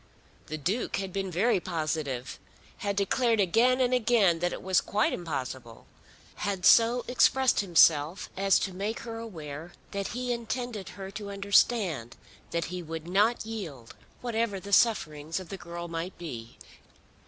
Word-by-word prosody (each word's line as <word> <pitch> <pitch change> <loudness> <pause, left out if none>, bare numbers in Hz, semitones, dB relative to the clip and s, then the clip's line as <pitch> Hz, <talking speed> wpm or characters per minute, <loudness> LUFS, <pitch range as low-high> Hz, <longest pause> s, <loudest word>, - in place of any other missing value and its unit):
The 155 - -4
Duke 190 - -1
had 195 -2 -4
been 195 -1 -2
very 190 +5 +2
positive, 155 -7 -3 0.4
had 200 -1 -2
declared 225 +3 +2
again 230 +7 +3
and 255 -1 +2
again 220 -8 +3
that 175 +1 0
it - - -6
was 190 -1 +3
quite 210 +2 +1
impossible, 130 -8 -5 0.5
had 200 -2 -2
so 235 +3 +6
expressed 260 +1 +3
himself 165 -3 +4
as 195 0 +4
to 190 - -2
make 205 +5 -3
her 225 -1 -6
aware 165 -7 -8 0.2
that 200 -1 -2
he 245 +1 -2
intended 235 -3 -4
her 195 -1 -7
to 205 0 -7
understand 200 - +2 0.3
that 170 -1 -1
he 180 - -3
would 165 0 -7
not 210 +6 +2
yield 165 - -7 0.3
whatever 230 -4 -1
the 200 +2 -7
sufferings 160 -8 +2
of 185 -3 -10
the - - -5
girl 170 -1 -7
might 170 +2 -5
be. 120 -9 -8
195 Hz, 155 wpm, -28 LUFS, 165-225 Hz, 0.5 s, so